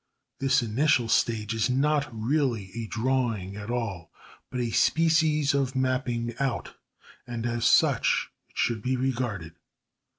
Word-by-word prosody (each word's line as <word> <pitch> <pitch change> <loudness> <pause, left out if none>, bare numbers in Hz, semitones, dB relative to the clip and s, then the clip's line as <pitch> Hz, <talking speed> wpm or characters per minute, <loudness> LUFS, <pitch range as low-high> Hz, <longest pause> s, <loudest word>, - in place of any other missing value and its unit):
This 135 -2 +2
initial 120 +2 +2
stage 110 -1 +1
is 115 +2 0
not 145 +3 +1
really 115 -3 -1
a 115 -1 -4
drawing 115 -5 -1
at 105 +1 -7
all, 105 -9 -3 0.4
but 125 - -4
a 120 -2 -1
species 155 -1 +3
of 135 -2 0
mapping 130 -2 -1
out, 135 -3 -2 0.5
and 120 -1 -4
as 120 -1 -1
such - - +3 0.2
it - - -21
should 115 -3 0
be 130 +3 0
regarded. 120 -10 -2
120 Hz, 135 wpm, -27 LUFS, 115-135 Hz, 0.5 s, species